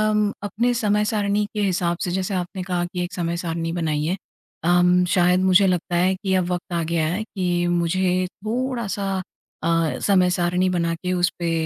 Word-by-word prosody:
म 210 -1 +2
अपने 235 +4 0
समय-सारणी 210 -2 +1
के 210 - -1
हिसाब 180 -3 0
से 180 - -2
जैसे 190 +1 -2
आपने 185 +1 -3
कहा 180 -1 -1
कि 180 0 -4
एक 175 - -6
समय-सारणी 170 -1 -2
बनाई 155 -3 -1
है। 185 +4 -1 0.5
अम 180 +1 +4
शायद 180 0 +4
मुझे 190 +1 +5
लगता 180 -1 0
है 185 +2 +3
कि 190 0 -2
अब 185 -2 +2
वक़्त 175 0 -4
आ 170 - 0
गया 160 -1 0
है 190 +6 -1
कि 180 -5 -1
मुझे 180 +2 +1
थोड़ा-सा 215 -1 -3 0.5
अ, 165 -1 +1
समय-सारणी 180 -1 +2
बना 170 -2 0
के 180 +2 -3
उस 180 0 +2
पे 170 -1 -1
180 Hz, 175 wpm, -22 LUFS, 175-195 Hz, 0.5 s, मुझे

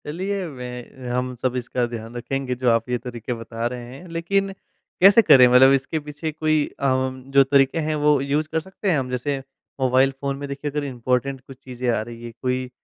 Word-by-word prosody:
चलिए, 190 +5 -3
वह 125 -2 -7
हम 125 0 -1
सब 130 -1 0
इसका 125 0 -1
ध्यान 115 0 -8
रखेंगे 130 +1 -3
जो 125 0 +1
आप 115 +1 +1
ये 125 - +1
तरीके 120 -1 -6
बता 115 0 -5
रहे 125 -1 -7
हैं, 180 +7 -12
लेकिन 195 +4 0 0.5
कैसे 195 +4 +8
करें 130 - +7
मतलब 125 +2 +7
इसके 135 +4 0
पीछे 150 +2 -5
कोई 155 -1 0 0.2
आम 130 0 -1
जो 140 0 +6
तरीके 135 +2 +3
हैं, 155 -1 -1
वो 150 -1 +3
यूज़ 145 +3 0
कर 160 - +1
सकते 190 +4 -4
हैं 160 - +2
हम? 130 -1 -4
जैसे 125 +3 -2 0.4
मोबाइल 130 +1 +4
फ़ोन 140 -1 -2
में 140 0 -6
देखिए 140 +1 -4
अगर 150 +1 -2
इम्पोर्टेन्ट 130 0 -1
कुछ 135 - -11
चीज़ें 125 -1 -5
आ 115 - +1
रही 115 +1 -9
हैं, 120 -1 -8
कोई 130 0 -1
130 Hz, 205 wpm, -23 LUFS, 125-150 Hz, 0.5 s, कैसे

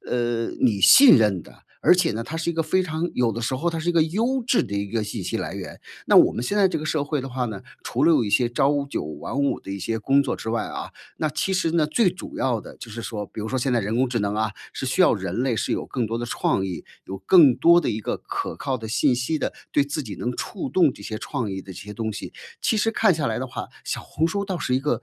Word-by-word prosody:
呃， 120 -1 0 0.2
你 105 -6 +3
信 245 - +9
任 100 -6 +2
的， - - -19 0.2
而 - - +6
且 175 -8 +1
呢， 115 +2 -3
它 160 +6 -6
是 165 +1 -1
一 - - -3
个 165 0 0
非 185 +4 +1
常 165 0 -3
有 120 -3 +1
的 115 - -4
时 120 +3 -1
候 165 +7 -1
它 165 - -4
是 165 +2 -3
一 - - +3
个 165 -2 +4
优 230 +10 0
质 250 - +3
的 100 - -6
一 100 0 -2
个 115 -2 -1
信 105 -1 -5
息 - - -2
来 - - -4
源。 - - -8 0.3
那 - - +5
我 - - +7
们 120 - -4
现 200 +11 -2
在 195 - +6
这 - - -2
个 155 - -6
社 155 -2 0
会 150 -2 -1
的 135 - -6
话 125 0 -2
呢， 105 -4 -6 0.2
除 130 +5 -1
了 165 - +6
有 120 - +3
一 100 - -3
些 120 +1 +3
朝 140 +3 +1
九 - - -3
晚 75 - -6
五 140 - +1
的 95 - -9
一 100 - -4
些 115 +4 -2
工 135 +6 +3
作 - - -2
之 110 - -7
外 115 -1 -1
啊， - - -6 0.3
那 155 - 0
其 190 - -1
实 185 -3 +1
呢， 160 -3 +2
最 185 +6 +2
主 - - -9
要 120 -4 0
的 - - -12
就 115 - -9
是 115 - -6
说 105 -1 -5
比 110 - -9
如 110 - -4
说 130 - -1
现 125 0 0
在 120 - +2
人 105 +3 -2
工 130 0 +2
智 120 -1 -1
能 100 0 -1
啊， 110 0 0 0.2
是 130 - -5
需 130 - 0
要 - - +5
人 95 +4 -3
类 130 -3 +1
是 - - -1
有 - - -2
更 125 -4 -2
多 115 +2 -3
的 120 - -3
创 95 -4 0
意， 90 -3 -6 0.2
有 95 - -6
更 140 - +6
多 170 +1 +6
的 - - -1
一 110 - -3
个 - - -2
可 - - -5
靠 130 -1 -2
的 110 -2 -7
信 125 +2 +2
息 125 +6 -1
的， - - -2 0.2
对 140 - +3
自 145 +1 -3
己 105 -5 -7
能 125 - -2
触 195 - -4
动 165 -8 +3
这 100 - -13
些 110 +1 -5
创 125 -5 -3
意 95 0 -4
的 95 - -10
这 - - -10
些 105 0 -8
东 110 0 -3
西。 100 - -7 0.3
其 220 - +1
实 225 +1 +2
看 215 -4 +4
下 150 -3 -1
来 110 - -1
的 130 - -3
话， 125 - -6 0.2
小 - - -3
红 160 - -1
书 200 +4 -2
倒 190 -2 -3
是 130 - -1
一 - - 0
个 150 - -1
125 Hz, 320 characters per minute, -24 LUFS, 110-160 Hz, 0.3 s, 信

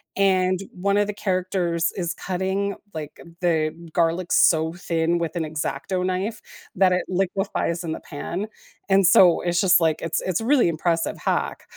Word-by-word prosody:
and 185 -2 +2
one 200 +2 0
of 205 0 +2
the 210 - -3
characters 185 -4 -1
is 175 -3 -2
cutting 190 +2 -2 0.2
like 155 -2 -7 0.2
the 160 -3 +1 0.2
garlic 170 +1 0
so 160 -1 +4
thin 170 -1 -1
with 165 0 -3
an 165 - -1
X-Acto 155 +4 -3
knife 190 +4 -2 0.3
that 185 0 +4
it 180 - 0
liquefies 185 -2 -1
in 165 - -4
the - - -4
pan, 175 +7 -5 0.4
and 195 -1 +4
so 175 0 +6
it's 175 0 0
just 185 -2 +5
like, 160 -1 +1
it's 165 0 -2
it's 185 +2 -1
a - - -4
really 265 -5 +4
impressive 165 0 -1
hack, - - -2
180 Hz, 170 wpm, -23 LUFS, 165-190 Hz, 0.4 s, so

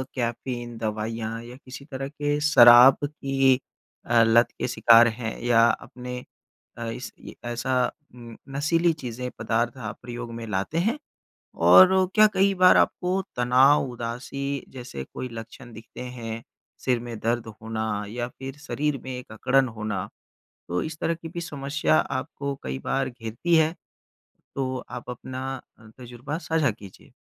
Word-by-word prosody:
Caffeine, 120 -1 -4
दवाइयाँ 110 +1 -3
या 120 +1 -10
किसी 135 +2 -10
तरह 135 -2 -5
के 145 0 -1
शराब 125 -3 +8
की 135 -2 +2 0.5
अ, 115 -1 +4
लत 115 +2 +5
के - - -1
शिकार 115 -1 +6
हैं 115 0 -4
या 120 -1 +4
आपने 125 +1 -1 0.6
अ, 115 - -4
इसकी 120 +2 -9
ऐसा 125 +1 0 0.2
उम, 120 -2 -11 0.2
नशीली 165 +3 +2
चीज़ें, 125 -4 -6
पदार्थ 115 +2 -1
आप 110 -4 -6
प्रयोग 120 -1 -7
में 115 0 -6
लाते 105 +9 -2
हैं? 225 - +1 0.6
और 185 0 +7
क्या 215 0 +8
कई 195 +1 +3
बार 185 0 +7
आपको 185 +2 +1
तनाव, 130 +4 +4
उदासी 125 +4 -4
जैसे 120 - -7
कोई 130 - -5
लक्षण 115 +2 -10
दिखते 110 +1 -11
हैं? 115 -2 -6 0.4
सिर 125 -2 0
में 120 -2 -7
दर्द 115 +1 -1 0.2
होना 110 0 -3 0.3
या 120 +2 -3
फिर 135 +2 -9
शरीर 150 -2 -2
में 130 - -6
एक 125 - -10
अकड़न 130 +4 +2
होना, 105 -3 -3 0.6
तो 90 +1 -1
इस 160 0 -6
तरह 165 - 0
की 165 0 -9
भी 170 0 -6
समस्या 145 0 -1
आपको 140 +1 -3
कई 65 0 -4
बार 135 0 0
घेरती 120 +7 -1
है? 160 +1 +3 0.8
तो 130 -1 -2
आप 125 0 -7
अपना 130 +1 -6 0.3
अ, 115 - -17
तज़ुर्बा 125 +5 -6
साझा 160 -4 +2
कीजिए। 100 -3 -13
125 Hz, 150 wpm, -25 LUFS, 115-140 Hz, 0.8 s, शराब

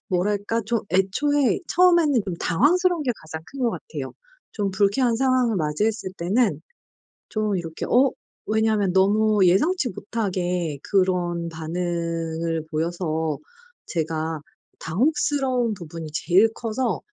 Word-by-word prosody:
뭐랄까 205 +4 0
좀 230 -2 0
애초에 265 +9 +2
처음에는 340 - +4
좀 185 -3 -3
당황스러운 335 - +2
게 255 - 0
가장 160 0 -8
큰 275 - -9
것 240 -2 +2
같아요. 460 - -6 0.4
좀 200 -3 -1
불쾌한 210 +5 +2
상황을 255 -4 +2
맞이했을 185 +6 -1
때는 205 +8 +1 0.7
좀 215 -2 -1
이렇게 165 -2 -5
어 260 +1 +4 0.4
왜냐하면 215 -3 +2
너무 205 +1 +4
예상치 260 - +3
못하게 180 - -2
그런 180 -3 +1
반응을 165 -1 -3
보여서 160 -1 -1 0.5
제가 160 -2 -2 0.4
당혹스러운 255 - +1
부분이 165 -2 -8
제일 195 +5 +4
커서 235 +1 -2
195 Hz, 270 characters per minute, -23 LUFS, 170-240 Hz, 0.7 s, 처음에는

